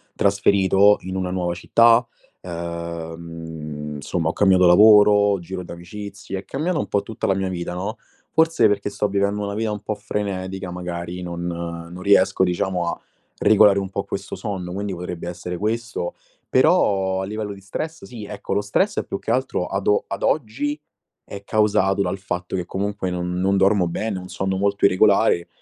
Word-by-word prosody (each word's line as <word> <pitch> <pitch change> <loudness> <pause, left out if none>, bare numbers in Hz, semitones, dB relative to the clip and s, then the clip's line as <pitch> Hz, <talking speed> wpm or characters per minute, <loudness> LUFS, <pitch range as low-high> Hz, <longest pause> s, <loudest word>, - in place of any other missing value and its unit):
trasferito 100 0 +4
in 95 +1 -5
una 90 -1 -2
nuova 90 -2 -1
città. 115 +6 +4 0.4
Uhm, 85 -3 -6
insomma, 80 +3 -2
ho - - -2
cambiato 95 -2 +4
lavoro, 105 +1 +6
giro 90 +2 -6
di 85 - -10
amicizie, 100 +3 -7
è 95 - -12
cambiato 155 - -1
un - - -2
po' 100 - +1
tutta 110 +1 -4
la 95 - +3
mia 95 -1 -1
vita, 85 -1 -4
no. 95 +6 -4 0.3
Forse, 160 -8 +4
perché 100 0 -1
sto 105 0 -1
vivendo 100 +1 0
una 100 0 -3
vita 110 0 -1
un 105 - -6
po' 105 +1 -3
frenetica, 95 -3 -4
magari, 90 0 -5
non 85 -1 -5
non 85 +1 -6
riesco, 95 -1 +4
diciamo, 90 0 -1
a - - -2 0.4
regolare 105 -1 +5
un 95 -1 -4
po' 100 +1 -3
questo 100 0 -5
sonno, 95 -5 -5
quindi 100 +1 -3
potrebbe 90 -1 -6
essere 90 0 -5
questo. 110 -2 -2 0.3
Però 95 -1 +3
a - - -3
livello 105 +1 -4
di 100 - -12
stress, 155 +12 -6
sì, 120 -4 -9
ecco, 100 -1 -5
lo 100 - +1
stress 190 - 0
è - - -2
più 100 - -5
che - - -7
altro 130 -8 0
ad 95 0 -3
o 105 - +3
ad 100 - -5
oggi 145 +3 -1 0.5
è 100 0 -9
causato 100 -2 +2
dal 95 0 -1
fatto 90 -1 -4
che, 90 -2 -2
comunque, 100 0 -3
non 90 0 -3
non 95 +1 +2
dormo 95 -2 +3
bene, 100 +3 -3
ho - - -8
un 90 - -10
sonno 95 0 -2
molto 100 +1 +1
irregolare, 100 -2 +4
95 Hz, 185 wpm, -22 LUFS, 90-105 Hz, 0.5 s, lavoro